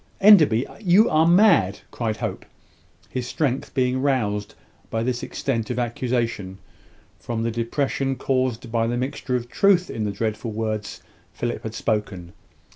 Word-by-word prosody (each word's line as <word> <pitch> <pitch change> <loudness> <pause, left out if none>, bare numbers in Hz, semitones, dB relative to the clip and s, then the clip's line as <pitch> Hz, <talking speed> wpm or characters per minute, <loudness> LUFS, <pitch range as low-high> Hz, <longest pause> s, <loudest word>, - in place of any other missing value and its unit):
"Enderby! 155 - +6
you 200 +2 +5
are 155 +1 +4
mad," 170 - +4
cried 110 -3 -2
Hope, - - -4 0.6
his 125 -1 -4
strength 135 -3 -1
being 130 -1 +1
roused 105 -7 -1 0.3
by 115 0 -1
this 125 0 -1
extent 115 -6 -3
of - - -3
accusation 120 -5 -2 0.6
from 115 -1 -3
the 115 - 0
depression 135 +3 -1
caused 130 -3 -1
by 115 -1 +1
the 120 +1 -1
mixture 130 0 -2
of 120 -1 -2
truth 180 +6 +3
in 110 - -3
the 105 - -1
dreadful 110 +2 -3
words 110 -1 -4 0.3
Philip 120 0 -3
had 110 - -6
just - - -6
spoken. 100 -6 -2
120 Hz, 150 wpm, -23 LUFS, 110-135 Hz, 0.6 s, Enderby